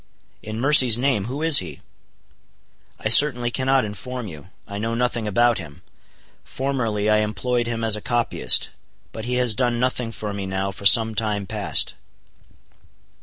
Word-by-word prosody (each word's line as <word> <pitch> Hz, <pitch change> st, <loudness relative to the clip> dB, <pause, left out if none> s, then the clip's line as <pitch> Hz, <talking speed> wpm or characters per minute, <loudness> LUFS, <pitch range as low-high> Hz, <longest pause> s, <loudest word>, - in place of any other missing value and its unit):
"In 110 Hz, +1 st, -8 dB
mercy's 130 Hz, -4 st, +5 dB
name, 125 Hz, -6 st, -1 dB
who 135 Hz, +6 st, -6 dB
is 160 Hz, -4 st, +7 dB
he?" -, -, -9 dB, 1.2 s
"I -, -, -3 dB
certainly 120 Hz, 0 st, +4 dB
cannot 130 Hz, 0 st, 0 dB
inform 120 Hz, +4 st, -8 dB
you. 85 Hz, -2 st, -12 dB, 0.2 s
I 100 Hz, 0 st, -7 dB
know 115 Hz, +2 st, -3 dB
nothing 120 Hz, -2 st, -2 dB
about 120 Hz, +2 st, +1 dB
him. 75 Hz, -5 st, -12 dB, 0.6 s
Formerly 115 Hz, -6 st, -3 dB
I 105 Hz, 0 st, +2 dB
employed 115 Hz, +3 st, -2 dB
him 115 Hz, -1 st, -4 dB
as 110 Hz, -2 st, +3 dB
a 105 Hz, -, -8 dB
copyist; 120 Hz, -, +2 dB, 0.4 s
but 110 Hz, -, -8 dB
he 125 Hz, +1 st, -3 dB
has 125 Hz, -2 st, +2 dB
done 120 Hz, +1 st, -2 dB
nothing 125 Hz, -2 st, -2 dB
for 105 Hz, -2 st, -7 dB
me 100 Hz, -1 st, -6 dB
now 95 Hz, +1 st, -4 dB
for 100 Hz, +1 st, 0 dB
some 110 Hz, 0 st, +5 dB
time 105 Hz, -2 st, -2 dB
past." -, -, 0 dB
115 Hz, 160 wpm, -21 LUFS, 105-125 Hz, 1.2 s, is